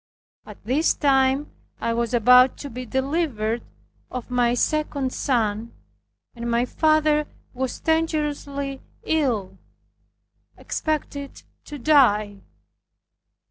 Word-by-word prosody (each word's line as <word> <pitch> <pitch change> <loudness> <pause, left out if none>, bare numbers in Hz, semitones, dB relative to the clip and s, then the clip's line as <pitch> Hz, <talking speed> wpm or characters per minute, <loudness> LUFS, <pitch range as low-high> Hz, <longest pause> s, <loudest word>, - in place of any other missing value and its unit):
At 210 - -12
this 280 +8 +2
time 270 0 +2 0.3
I 230 - -1
was 235 0 -1
about 250 +2 +5
to 285 - -8
be 250 +1 -7
delivered 260 -5 -1 0.5
of 250 0 -7
my 245 -1 +2
second 285 -1 -1
son, 225 -3 -1 0.6
and 235 0 -5
my 235 +1 +2
father 310 +1 +2 0.3
was 260 0 -3
dangerously 295 -4 -1 0.2
ill, 225 -12 -1 1.0
expected 290 -2 -4 0.2
to 295 - -8
die. 215 -8 +3
265 Hz, 100 wpm, -23 LUFS, 235-295 Hz, 1.0 s, about